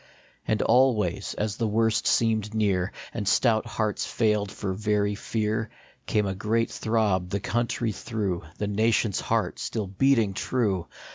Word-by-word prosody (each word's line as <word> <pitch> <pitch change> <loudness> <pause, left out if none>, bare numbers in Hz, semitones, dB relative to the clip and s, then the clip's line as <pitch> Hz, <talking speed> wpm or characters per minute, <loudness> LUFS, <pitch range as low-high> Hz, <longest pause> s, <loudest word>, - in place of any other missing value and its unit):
And 110 - +1
always, 110 -8 +2
as 105 -1 -2
the 115 - 0
worst 110 +1 +1
seemed 110 -2 +1
near, 100 -3 +1 0.2
And 105 -4 -3
stout 110 +1 +3
hearts 110 -2 -1
failed 105 -3 0
for 95 -2 -3
very 105 0 0
fear, 110 +1 -2 0.4
Came 105 -1 +1
a 95 - -1
great 110 +4 0
throb 105 -5 0
the 100 - -1
country 120 +2 -1
through, 100 -4 -3 0.2
The 105 - -2
nation 110 +1 +2
s - - -1
heart 110 -5 -1
still 110 -3 -3
beating 110 +1 +2
true 95 -5 -1
105 Hz, 150 wpm, -26 LUFS, 100-115 Hz, 0.4 s, stout